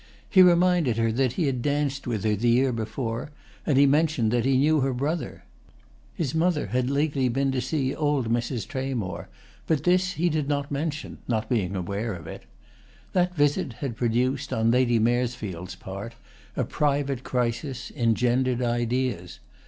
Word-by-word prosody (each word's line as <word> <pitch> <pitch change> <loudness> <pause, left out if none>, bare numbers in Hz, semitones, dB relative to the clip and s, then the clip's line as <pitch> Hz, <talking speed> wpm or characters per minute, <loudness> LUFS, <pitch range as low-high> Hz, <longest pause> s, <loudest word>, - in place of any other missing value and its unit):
He 190 - +6
reminded 175 -8 +4
her 115 -1 +2
that 125 +1 +1
he 165 - 0
had 130 -3 -1
danced 140 -1 -1
with 110 -5 -2
her 105 -1 +2
the 120 +4 +1
year 130 +3 +3
before, 115 +2 -3 0.4
and 145 -4 +3
he 140 - +7
mentioned 145 -5 +2
that 120 0 +1
he 135 -1 +3
knew 150 +3 +3
her 135 -1 0
brother. 150 +6 -3 0.7
His 155 -5 -2
mother 160 -1 +1
had 125 0 0
lately 140 -2 +1
been 135 +3 0
to 130 -1 -1
see 135 -3 -1
old 145 -5 0
Mrs. 115 -1 -1
Tramore, 130 -9 -4 0.4
but 155 -4 +1
this 185 +1 +2
he 170 +3 0
did 155 -3 0
not 145 -1 -1
mention, 150 +2 -3
not 110 -2 -1
being 100 -5 0
aware 100 +4 -3
of 80 -2 -10
it. 80 - -9 0.7
That 180 -1 +1
visit 145 -4 +1
had 125 0 -5
produced, 125 +4 0
on 115 +1 +2
Lady 120 -1 +3
Maresfield's 110 -6 -1
part, 100 +5 -8 0.4
a - - 0
private 140 -3 -1
crisis, 125 +2 -2
engendered 120 +2 +1
ideas. 120 -5 -1
130 Hz, 165 wpm, -26 LUFS, 115-145 Hz, 0.7 s, he